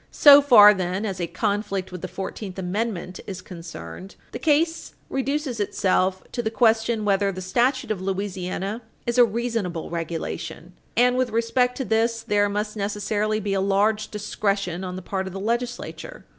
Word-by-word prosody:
So 285 -1 +8
far, 215 -7 +8
then, 185 +2 -2
as 190 -3 -3
a 170 - -1
conflict 200 -2 -2
with 180 -2 -7
the 185 - -4
Fourteenth 190 +1 -6
Amendment 185 -1 -3
is 190 -3 -5
concerned, 165 - -9 0.2
the - - -6
case 320 +2 +1 0.2
reduces 270 -2 -2
itself 190 -2 +1
to 240 - -2
the 220 - -1
question 225 -1 +2
whether 200 0 +2
the 185 - -7
statute 240 +8 0
of 200 -4 -2
Louisiana 195 +2 -3 0.2
is 240 +1 0
a - - +10
reasonable 225 -8 -3
regulation, 165 +1 -5 0.2
and, 250 +1 +4
with 255 -1 +1
respect 235 +2 +1
to 265 - -2
this, 230 0 +1
there 205 0 +2
must 210 +1 -3
necessarily 210 +1 -1
be 205 -1 -2
a 195 - +1
large 210 +2 +1
discretion 200 -3 -2
on 180 -1 -5
the 185 - -7
part 190 0 -3
of 190 - -7
the 195 - -5
legislature. 245 - -4
205 Hz, 170 wpm, -24 LUFS, 190-230 Hz, 0.2 s, a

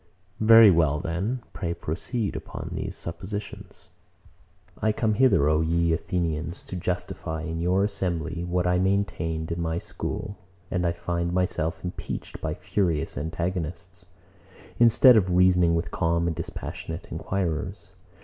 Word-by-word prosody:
Very 115 -1 +8
well: 80 -4 +3 0.5
Pray 85 -4 -3
proceed 100 +7 -3
upon - - -6
these - - -4
suppositions. 100 +5 -7 0.9
104. 110 - +1
I - - +4
come 110 0 +1
hither, 110 - +4
O 75 +1 +3
ye 85 +1 +2
Athenians, 85 0 -2
to - - -7
justify 85 -3 -3
in 80 0 -4
your 90 +3 +2
assembly 85 -4 -2
what 90 0 0
I 90 0 +2
maintained 85 -5 -1
in 85 +1 -2
my 80 0 -1
school, 100 +3 -5 0.3
and 90 -1 +1
I - - +2
find 85 0 -2
myself 85 -3 -1
impeached 90 -2 -6
by - - -2
furious 85 -8 -1
antagonists, 85 +3 -4 0.7
instead 120 +2 +7
of 95 -3 +2
reasoning 90 -2 +5
with 85 - -2
calm 85 0 +1
and 85 -2 -1
dispassionate 85 +2 -6
enquirers. 85 -6 -3
85 Hz, 135 wpm, -26 LUFS, 80-95 Hz, 0.9 s, Very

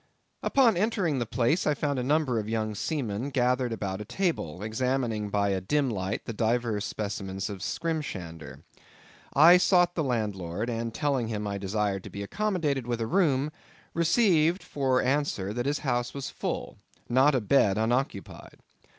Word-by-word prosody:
Upon 240 -8 +3
entering 185 - +1
the 120 - -2
place 125 +9 +1
I 150 - +3
found 145 -2 -1
a - - -1
number 140 -3 +1
of 105 0 -4
young 110 -1 -1
seamen 120 -1 -2
gathered 125 -1 +1
about 100 -3 -3
a - - -3
table, 115 - -2
examining 110 -1 -1
by 100 0 +1
a 95 -1 0
dim 140 +6 +1
light 95 -2 -3
divers 115 -1 0
specimens 100 -1 -4
of 100 - -7
skrimshander. 90 - -4 0.7
I 165 +5 +8
sought 175 -1 +4
the 165 - -1
landlord, 105 - -2
and 115 0 -3
telling 135 -2 0
him 105 -2 -3
I 100 -1 -3
desired 100 -1 -1
to - - -7
be 100 - -6
accommodated 155 - -1
with 120 -1 -1
a 115 - -1
room, 150 -3 +2 0.4
received 170 -1 +3
for 130 -3 0
answer 130 -8 0
that 120 +3 -2
his 145 +1 +1
house 120 -1 -1
was 140 -2 -5
full—not 135 +4 -1
a - - +3
bed 105 -3 +3
unoccupied. 115 -2 -2
120 Hz, 160 wpm, -28 LUFS, 105-145 Hz, 0.7 s, I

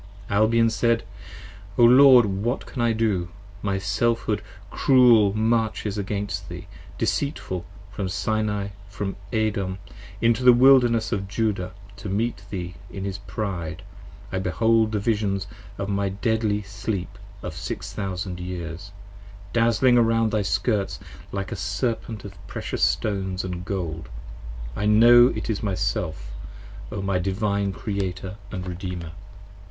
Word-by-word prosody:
Albion 115 +2 +4
said. 115 0 +2 0.7
O 120 - +5
Lord 125 0 +8
what 105 +6 -2
can 125 - -5
I 120 -1 +3
do: 105 -6 0 0.3
my 100 -1 0
Selfhood 105 +2 0 0.3
cruel 120 -6 +5
Marches 110 -2 0
against 100 -1 -3
thee, - - -7 0.3
deceitful, 95 - -2 0.3
from 100 -1 -3
Sinai 105 0 -1
& 100 0 -19
from 100 -1 -4 0.2
Edom 105 -5 0
10 - - -17 0.3
Into 115 +1 +2
the 125 -1 +9
Wilderness 120 -3 +5
of 100 -4 -1
Judah 100 -3 -1 0.2
to 100 0 -6
meet 105 +1 -1
thee 90 -3 -5 0.2
in 95 - -6
his 100 0 -4
pride. 95 -4 -4 0.5
I 95 - -1
behold 110 +5 +2
the 110 - 0
Visions 100 -2 0 0.3
of 100 - -3
my 100 -1 0
deadly 105 +1 0
Sleep 100 -1 -4 0.2
of 90 - -4
Six - - -5
Thousand 95 -2 -4
Years, 90 +1 -6 0.6
Dazling 115 +2 +4
around 115 -1 +3
thy 110 - +1
skirts 100 +1 0 0.3
like 95 -1 -4
a - - -2
Serpent 110 0 -3
of 100 - -8
precious - - -4
stones 95 -3 0
& 90 - -7
gold: 85 - -4 0.7
I 105 - -1
know 120 +3 +8
it 110 -4 -3
is 110 -3 -1
my 100 -3 -1
Self: 80 -9 -2 0.6
O 100 -2 -4
my 95 -1 +1
Divine 100 +1 0
Creator 95 -1 -4
& - - -16
Redeemer. 90 -3 -5
100 Hz, 135 wpm, -24 LUFS, 95-115 Hz, 0.7 s, the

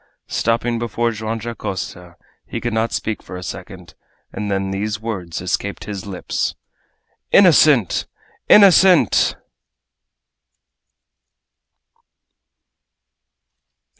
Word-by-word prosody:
Stopping 115 +1 0
before 120 0 -1
Joam 110 +1 -4
Dacosta, 95 -6 -6 0.3
he - - -4
could 120 -1 -3
not 110 +1 0
speak 110 -1 -3
for - - -10
a 90 - -7
second, 85 - -9 0.4
and 105 +1 -4
then 95 -1 -1
these 105 +2 -3
words 95 -8 -5
escaped 95 +3 -3
his 100 -2 -7
lips: 95 -3 -3 0.8
"Innocent! 150 - +5 0.4
Innocent!" 190 -2 +6
110 Hz, 85 wpm, -19 LUFS, 95-120 Hz, 0.8 s, Innocent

